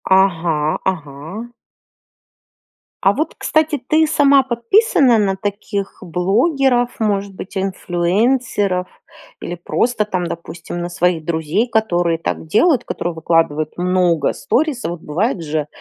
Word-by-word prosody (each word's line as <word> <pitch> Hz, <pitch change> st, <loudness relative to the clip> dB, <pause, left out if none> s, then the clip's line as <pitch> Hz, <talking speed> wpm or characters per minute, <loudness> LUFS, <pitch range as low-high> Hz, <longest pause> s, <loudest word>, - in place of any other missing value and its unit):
Ага, 165 Hz, -5 st, +1 dB
ага. 165 Hz, +9 st, -9 dB, 1.5 s
А 195 Hz, -, +5 dB
вот 310 Hz, +5 st, -2 dB
кстати, 310 Hz, -3 st, +1 dB
ты 315 Hz, 0 st, +3 dB
сама 280 Hz, -2 st, +4 dB
подписана 255 Hz, -, +3 dB
на 195 Hz, -2 st, +1 dB
таких 200 Hz, 0 st, -4 dB
блогеров, 245 Hz, -, +1 dB
может 200 Hz, -2 st, -1 dB
быть, 190 Hz, +1 st, -8 dB
инфлюенсеров 190 Hz, +2 st, 0 dB, 0.5 s
или 175 Hz, -, -4 dB
просто 220 Hz, +5 st, 0 dB
там, 185 Hz, -3 st, -2 dB
допустим, 170 Hz, +1 st, -7 dB
на 175 Hz, 0 st, -3 dB
своих 175 Hz, -2 st, 0 dB
друзей, 165 Hz, +8 st, 0 dB
которые 175 Hz, -7 st, +1 dB
так 160 Hz, -1 st, -4 dB
делают, 265 Hz, -, +3 dB
которые 175 Hz, 0 st, -3 dB
выкладывают 160 Hz, -1 st, 0 dB
много 180 Hz, -3 st, +2 dB
сторисов, 245 Hz, -, -1 dB
бывает 185 Hz, -, -1 dB
же, 150 Hz, -1 st, -2 dB
190 Hz, 115 wpm, -18 LUFS, 170-240 Hz, 1.5 s, А